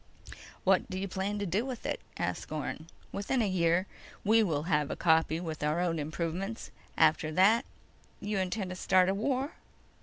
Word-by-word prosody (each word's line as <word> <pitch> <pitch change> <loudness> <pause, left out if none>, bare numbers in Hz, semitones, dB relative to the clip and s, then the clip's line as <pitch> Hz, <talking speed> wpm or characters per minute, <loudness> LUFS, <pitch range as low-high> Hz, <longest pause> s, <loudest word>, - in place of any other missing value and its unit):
"What - - +3
do 185 - -4
you 195 +1 -2
plan 195 +2 -2
to 205 - -2
do 195 +5 0
with 255 -2 -6
it?" - - -1 0.2
asked - - -3
Orne. 155 +1 -4 0.2
"Within 205 +6 -1
a 220 - +2
year 175 -1 +2 0.4
we 220 +2 +5
will 155 -8 0
have 150 -3 +1
a - - -2
copy 160 -1 +3
with 160 -3 -5
our 150 +3 +1
own 170 -2 0
improvements. 170 +8 -3 0.3
After 155 -4 +3
that—" 205 +7 +5 0.5
"You 205 -1 -2
intend 185 0 -2
to - - -4
start 185 0 +3
a - - +2
war?" 265 +7 -1
185 Hz, 180 wpm, -30 LUFS, 165-205 Hz, 0.5 s, we